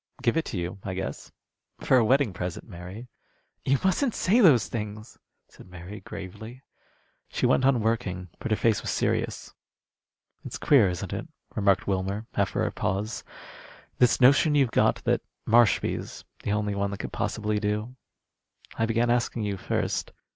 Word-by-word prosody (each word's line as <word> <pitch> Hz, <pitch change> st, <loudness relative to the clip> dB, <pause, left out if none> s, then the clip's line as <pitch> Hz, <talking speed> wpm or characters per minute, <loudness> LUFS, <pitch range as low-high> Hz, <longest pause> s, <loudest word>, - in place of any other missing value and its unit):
"Give 120 Hz, +1 st, +2 dB
it 165 Hz, -, +1 dB
to 105 Hz, -, -4 dB
you, 90 Hz, +3 st, -4 dB
I 95 Hz, -1 st, -4 dB
guess. 95 Hz, -, -5 dB, 0.5 s
For 130 Hz, -, +3 dB
a 120 Hz, -, +5 dB
wedding 130 Hz, -2 st, +3 dB
present, 90 Hz, -1 st, -5 dB
Mary." 95 Hz, +5 st, -9 dB, 0.6 s
"You 135 Hz, +1 st, +3 dB
mustn't 215 Hz, +7 st, +1 dB
say 210 Hz, +7 st, +3 dB
those 155 Hz, -, +6 dB
things," 105 Hz, 0 st, -6 dB, 0.3 s
said -, -, -16 dB
Mary, 90 Hz, +3 st, -9 dB
gravely. 110 Hz, +7 st, -9 dB, 0.7 s
She -, -, -1 dB
went 130 Hz, -, +3 dB
on 130 Hz, -4 st, +4 dB
working, 95 Hz, -5 st, -1 dB
but 135 Hz, -, -4 dB
her 110 Hz, -, +2 dB
face 115 Hz, -3 st, +2 dB
was -, -, -4 dB
serious. -, -, -1 dB, 0.9 s
"It's -, -, -6 dB
queer, 120 Hz, -10 st, +5 dB
isn't 90 Hz, -1 st, -4 dB
it," -, -, -4 dB, 0.3 s
remarked 100 Hz, -2 st, +2 dB
Wilmer, 100 Hz, +2 st, -2 dB
after -, -, 0 dB
a -, -, -1 dB
pause, 105 Hz, +4 st, -2 dB, 0.8 s
"this 125 Hz, -1 st, +4 dB
notion 140 Hz, +4 st, +5 dB
you've 135 Hz, -5 st, +3 dB
got -, -, +2 dB
that -, -, +1 dB, 0.3 s
Marshby's 115 Hz, -3 st, +2 dB, 0.2 s
the -, -, -2 dB
only 105 Hz, 0 st, 0 dB
one 100 Hz, 0 st, -1 dB
that 100 Hz, 0 st, -6 dB
could -, -, -6 dB
possibly 105 Hz, -1 st, -1 dB
do? 105 Hz, +4 st, -2 dB, 0.8 s
I 115 Hz, -, +2 dB
began 115 Hz, +1 st, +2 dB
asking 120 Hz, -1 st, 0 dB
you 100 Hz, -1 st, -1 dB
first." 95 Hz, -, -2 dB
110 Hz, 160 wpm, -27 LUFS, 100-125 Hz, 0.9 s, those